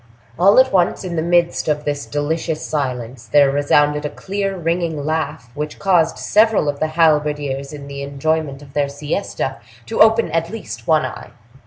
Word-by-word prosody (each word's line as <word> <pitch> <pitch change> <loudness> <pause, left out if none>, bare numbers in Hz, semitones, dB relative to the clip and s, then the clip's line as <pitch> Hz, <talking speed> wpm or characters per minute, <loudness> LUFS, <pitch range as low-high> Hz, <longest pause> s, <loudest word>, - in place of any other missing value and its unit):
All 195 +5 +5
at 260 -3 +4
once, 180 0 +2
in 180 -2 -4
the 160 - 0
midst 170 0 +1
of 150 -1 0
this 145 -1 -3
delicious 155 +2 -2
silence, 125 -5 -4
there 140 +2 +4
resounded 145 +1 +2
a 150 - -2
clear 195 +2 -3
ringing 165 -3 -2
laugh, 155 -5 -3
which 150 +2 -5
caused 175 -4 +2
several 215 -6 +3
of 145 -1 -2
the 155 - +1
halberdiers 150 -3 +1
in 145 -2 -8
the 140 0 -7
enjoyment 140 0 -2
of 140 -2 -16
their 145 -1 0
siesta 145 -1 -3 0.3
to - - -1
open 220 -4 +5
at 165 +1 0
least 115 - -8
one 155 -1 +3
eye. - - -7
150 Hz, 175 wpm, -19 LUFS, 140-170 Hz, 0.3 s, All